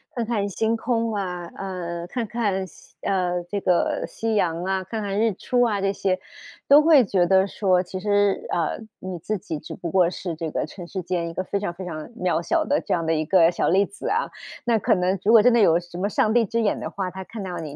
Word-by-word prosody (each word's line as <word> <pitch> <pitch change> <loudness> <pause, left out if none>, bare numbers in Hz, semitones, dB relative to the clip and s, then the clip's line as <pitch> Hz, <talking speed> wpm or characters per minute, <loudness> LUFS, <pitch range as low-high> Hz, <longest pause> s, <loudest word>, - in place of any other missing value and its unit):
看 235 -2 -1
看 215 -3 -1
星 220 +3 0
空 230 -1 -1
啊， 180 -4 -3
呃， 175 -3 -5
看 235 +5 -3
看 205 -4 -1
夕 185 - -18
呃， 180 -3 0
这 205 - -1
个 180 -2 +1
夕 225 0 -3
阳 170 -4 0
啊， 190 0 0
看 220 +4 -4
看 200 0 -2
日 225 -1 +2
出 245 +6 0
啊 210 -4 +1
这 195 - +1
些， 195 -1 0 0.5
都 290 +2 +9
会 305 -4 +6
觉 190 -4 +2
得 190 +1 +4
说， 185 -2 +1
其 185 +1 -6
实 205 -1 +1
呃， 165 -3 -1 0.2
你 185 -2 -6
自 210 +5 -2
己 170 -5 -5
只 - - -8
不 170 -3 -5
过 180 -3 +4
是 180 -1 -5
这 160 0 -4
个 - - -2
尘 175 +2 -10
世 190 - -4
间 175 -1 -2
一 - - -8
个 185 - -2
非 200 - -2
常 195 -4 -3
非 185 +2 -8
常 155 -3 -6
渺 180 -7 -1
小 320 - +1
的 290 -1 +1
这 - - -2
样 165 -2 0
的 165 - +1
一 155 0 0
个 170 0 +5
小 175 - 0
粒 195 +3 +4
子 405 - -8
啊。 - - 0 0.3
那 235 -2 +2
可 - - +3
能 185 +1 0
如 220 - +5
果 220 -2 +8
真 250 - +6
的 235 - +4
有 170 -6 +5
什 175 0 -11
么 190 +3 0
上 215 +1 +1
帝 235 -1 +4
之 230 +3 -1
眼 210 - +1
的 - - -4
话， 185 -2 -4
他 190 0 -8
看 215 0 -7
到 180 -2 -5
你 155 -4 -6
190 Hz, 270 characters per minute, -24 LUFS, 175-215 Hz, 0.5 s, 都